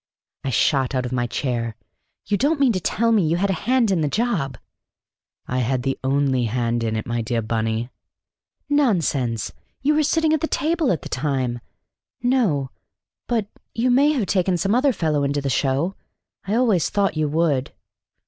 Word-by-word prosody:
I 135 - -2
shot 130 +2 +2
out 130 -1 0
of 125 - -4
my 120 -1 0
chair. 120 -3 -2 0.5
"You 205 - +1
don't 285 +7 +1
mean 270 -3 +4
to 190 - -1
tell 230 +7 +1
me 220 -3 +4
you 165 +2 +1
had 195 +2 +1
a 195 +4 -4
hand 250 -5 +3
in 180 -4 +1
the 150 - +1
job?" 165 - -1 0.9
"I 125 - -2
had 125 +1 0
the 135 0 0
only 135 -2 +1
hand 120 0 -1
in 110 -1 -1
it, 110 - -3
my 120 0 -2
dear 115 0 -1
Bunny." 115 +2 -2 0.8
"Nonsense! 165 - +1 0.3
You 295 +2 +3
were 305 - +3
sitting 315 +1 +2
at 315 - +1
table 320 - +1
at 165 - -2
the - - -6
time. 130 -3 -1 0.6
No, 200 - +1 0.6
but 230 -4 0 0.3
you 245 +2 +2
may 280 +4 +5
have 250 -8 0
taken 185 -2 +1
some 195 +5 0
other 265 +3 +3
fellow 155 - 0
into 140 +1 0
the 140 -1 -2
show. 140 +8 0 0.5
I 205 - -1
always 225 -9 +2
thought 200 -4 +1
you 155 -1 0
would!" 150 -4 +1
155 Hz, 180 wpm, -22 LUFS, -, 0.9 s, may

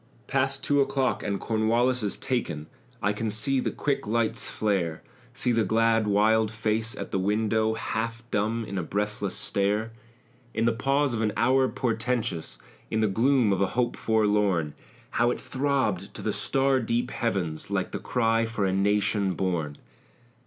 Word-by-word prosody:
"Past 135 0 0
two 145 -1 +3
o'clock 135 -1 0
and 100 -2 -2
Cornwallis 115 +3 +1
is 105 -2 -2
taken." 85 - -2 0.4
I 100 +1 +2
can 110 +2 -2
see 110 +6 +2
the - - 0
quick 140 -6 -2
lights 115 0 0
flare, 95 -7 -1 0.3
See 125 -1 0
the 115 -1 +2
glad, 115 0 +2
wild 110 +2 +3
face 110 +2 -1
at - - -6
the 95 - 0
window, 110 +2 +1
Half 115 +1 -3
dumb 110 +3 0
in 100 -2 -4
a - - 0
breathless 105 +2 -2
stare. 105 +3 0 0.6
In 115 - +1
the 115 - +4
pause 135 +3 +1
of 110 - -1
an 110 -1 +1
hour 130 +2 +4
portentous, 115 -7 -2 0.3
In 110 - 0
the 110 - +3
gloom 115 +1 +3
of 95 - -1
a 100 - +3
hope 120 -1 +1
forlorn, 105 -8 +1 0.4
How 120 +1 +2
it - - -2
throbbed 130 -8 -1
to - - -7
the - - 0
star 135 0 +2
deep 120 +1 -1
heavens, 90 -9 -2
Like - - -1
the - - -4
cry 115 -2 +1
for 110 -3 -1
a 95 - +1
nation 100 -1 +1
born! 80 -6 -2
110 Hz, 165 wpm, -27 LUFS, 100-120 Hz, 0.6 s, the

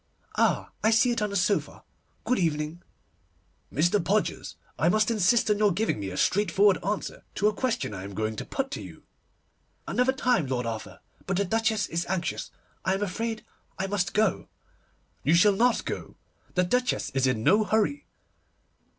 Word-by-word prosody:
'Ah, - - +1
I 220 - +5
see 225 +2 +4
it 235 - -1
on 210 - 0
the 200 - -5
sofa! 200 +2 0 0.4
Good 255 - +1
evening.' 155 0 -1 0.9
'Mr. 175 +6 +2
Podgers, 210 +3 -1 0.2
I 165 - +3
must 215 +4 +2
insist 225 +2 +3
on 210 - +1
your 210 -1 +4
giving 200 - 0
me 100 -1 -4
a 90 - -6
straightforward 200 0 +3
answer 200 +2 -3
to 210 - +2
a 215 - +2
question 245 - -2
I 95 - -6
am 100 0 -8
going 110 +1 -2
to - - -3
put 270 0 -3
to - - -4
you.' - - -11 0.8
'Another 250 +1 +2
time, 250 - +1
Lord 125 -2 -1
Arthur, 115 -1 -6 0.3
but 190 -1 0
the 200 - +1
Duchess 220 +1 +1
is 170 +1 -3
anxious. 175 -2 -2 0.3
I 190 - +1
am 200 - -2
afraid 225 +3 -3 0.3
I 190 - -1
must 195 -2 -1
go.' 215 -3 +1 0.8
'You 155 +5 +4
shall 200 +4 +5
not 240 +4 +2
go. - - -5 0.4
The 180 - +3
Duchess 250 +7 0
is 135 0 +1
in 120 -4 0
no 210 - +5
hurry. 220 +7 0
200 Hz, 175 wpm, -27 LUFS, 170-220 Hz, 0.9 s, I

